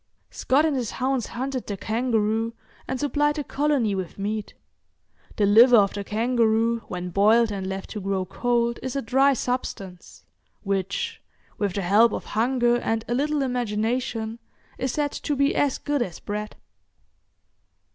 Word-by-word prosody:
Scott 275 - +2
and 310 -3 +1
his 245 -4 -2
hounds 260 -2 0
hunted 260 +1 -4
the 200 - -4
kangaroo, 225 0 0 0.3
and 260 0 -3
supplied 295 0 +1
the 295 - -3
colony 280 -7 0
with 185 -3 -4
meat. 210 +1 -4 0.8
The 210 - +2
liver 230 +5 +7
of 200 -2 +3
the 205 - -4
kangaroo 230 +1 +1
when 180 -2 -5
boiled 215 +4 +4
and 195 -2 -4
left 190 0 -5
to 215 - -4
grow 190 -1 -1
cold 235 +3 0
is 260 +1 -4
a 275 - 0
dry 270 +4 +4
substance, 200 -8 -5 0.4
which, 195 -1 -2 0.4
with 200 -3 0
the 200 - -2
help 210 +5 +4
of - - -4
hunger 240 +2 +2
and 225 -1 -2
a 240 - -1
little 290 +2 0
imagination, 230 -1 -2 0.4
is 260 -1 -1
said 290 +1 -1
to 290 - -3
be 280 +1 +2
as 285 -2 +1
good 290 -2 -1
as 180 -8 -3
bread. 210 +1 -5
230 Hz, 155 wpm, -24 LUFS, 205-260 Hz, 0.8 s, liver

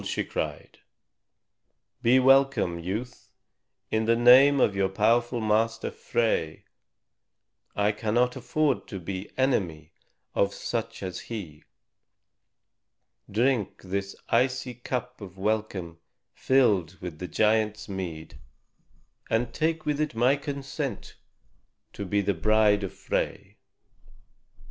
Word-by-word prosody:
she - - -2
cried; - - -5 1.2
"be 125 +3 +5
welcome, 135 -9 +3
youth, 105 +9 -5 0.6
in 110 0 +1
the 115 +1 +3
name 130 +4 +7
of 100 - +3
your 95 -1 +1
powerful 120 +5 +2
master, 115 +1 0
Frey. 110 -10 -1 1.1
I 105 0 +2
cannot 115 +4 0
afford 135 +4 0
to 95 - -6
be 95 +3 -6
enemy 90 - 0 0.4
of 100 0 +1
such 115 -2 -4
as 95 -1 -4
he. 90 -10 -8 1.7
Drink 115 0 0
this 100 +1 -4
icy 130 +1 +1
cup 125 0 -5
of 95 -2 -10
welcome 95 -5 -2 0.3
filled 100 -10 +2
with 85 -4 -7
the 90 - -5
giant's 105 +1 +1
mead, 80 -7 -6 0.9
and 115 +1 0
take 160 0 -1
with 150 0 0
it 150 -6 -2
my 125 +4 +4
consent 140 -1 -5 0.8
to 100 - -5
be 100 +2 +1
the 100 0 0
bride 105 +4 +3
of 95 - -3
Frey. - - -3
110 Hz, 110 wpm, -27 LUFS, 95-125 Hz, 1.7 s, name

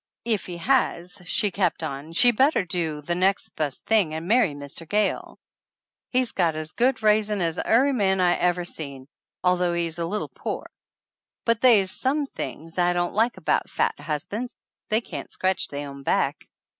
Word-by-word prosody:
"If 220 -4 0
he 175 -1 -6
has," 180 -4 0
she 205 +3 +1
kept 180 -3 0
on, 140 +3 -5
"sheV 240 +7 +5
better 265 - +3
do 165 -4 -2
the 175 - -1
nex' 190 +3 +1
best 145 -4 -4
thing 200 -9 +2
and 160 +2 -5
marry 215 - +3
Mr. 145 +3 -9
Gayle. 210 0 0 0.7
He's 255 -2 +1
got 170 -4 +1
as 155 0 -4
good 245 -1 +1
raisin' 210 -1 +3
as 165 -3 0
ary 265 +5 +3
man 190 -5 +2
I 180 -1 +4
ever 180 0 +1
seen, 140 -6 -6 0.4
although 180 -1 +2
he's 170 -1 -2
a 165 - -1
little 210 +4 -3
pore. - - -6 0.7
But 230 -1 +2
they's 210 -7 +5
some 285 +3 0
things 165 - -6
I 175 0 +3
don't 175 0 -1
like 225 +3 +1
about - - 0
fat - - +1
husban's 200 - -4 0.3
they 220 +1 +2
can't - - -7
scratch 190 0 0
they 145 0 -5
own 140 -1 -9
back!" - - 0
180 Hz, 175 wpm, -25 LUFS, 165-220 Hz, 0.7 s, sheV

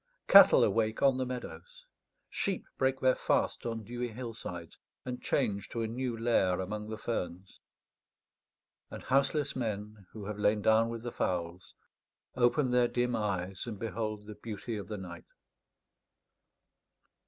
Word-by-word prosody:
Cattle - - +9
awake 110 -1 +1
on 135 -2 +5
the 130 -1 -1
meadows; - - -8 0.4
sheep 195 -2 -1
break 130 0 +1
their 130 0 +5
fast - - 0
on 115 -1 -3
dewy 120 +3 -4
hillsides, 110 -8 -7 0.3
and 125 -1 -5
change 100 -7 0
to 115 - -2
a - - -1
new 120 +1 -3
lair 110 -6 +2
among 105 +3 -4
the 110 - -4
ferns; 95 -5 -5 1.3
and - - -8
houseless 140 +2 +1
men, 105 -4 -4
who 105 -2 -8
have 105 0 -5
lain 105 0 +2
down 110 +1 +4
with 115 -1 -6
the 120 - -4
fowls, 90 -2 -3 0.6
open 125 +2 +3
their 125 -1 +4
dim 120 0 0
eyes 95 -1 -2
and 110 -3 -5
behold 110 -1 -4
the 105 - -8
beauty 105 +1 -6
of 100 -2 -6
the 105 0 -5
night. 85 -3 -9
110 Hz, 145 wpm, -31 LUFS, 105-125 Hz, 1.3 s, Cattle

